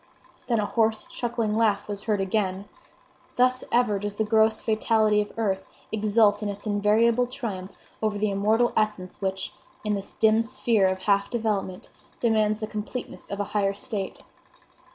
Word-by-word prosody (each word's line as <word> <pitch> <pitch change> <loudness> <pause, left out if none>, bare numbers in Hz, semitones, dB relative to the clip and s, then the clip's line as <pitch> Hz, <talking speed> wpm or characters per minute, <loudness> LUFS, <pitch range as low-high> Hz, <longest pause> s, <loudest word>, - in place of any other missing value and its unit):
Then 235 -3 +2
a 210 - +1
hoarse, 220 0 +1
chuckling 230 -3 -2
laugh 215 -3 +2
was 205 -1 -4
heard 210 -3 +1
again! 195 -1 -1 0.7
Thus 255 +1 +3
ever 235 -4 +2
does 205 0 -4
the 220 - +1
gross 220 +1 +3
fatality 215 -1 +2
of 210 - -5
earth 195 -4 0 0.3
exult 210 -1 +3
in 210 - -2
its 200 +1 -7
invariable 220 +4 +3
triumph 205 -7 -6 0.2
over 215 -1 0
the 210 0 0
immortal 215 +4 +2
essence 210 -4 -1
which, 190 0 -2 0.3
in 210 -1 0
this 200 -1 -4
dim 220 0 +4
sphere 230 -4 +2
of 185 0 -2
half 200 -1 +2
development, 215 -4 -2 0.3
demands 215 -2 +2
the 215 - -3
completeness 215 +3 -6
of 200 - -4
a - - +1
higher 200 -1 +1
state. 205 -2 -5
215 Hz, 160 wpm, -26 LUFS, 200-225 Hz, 0.7 s, dim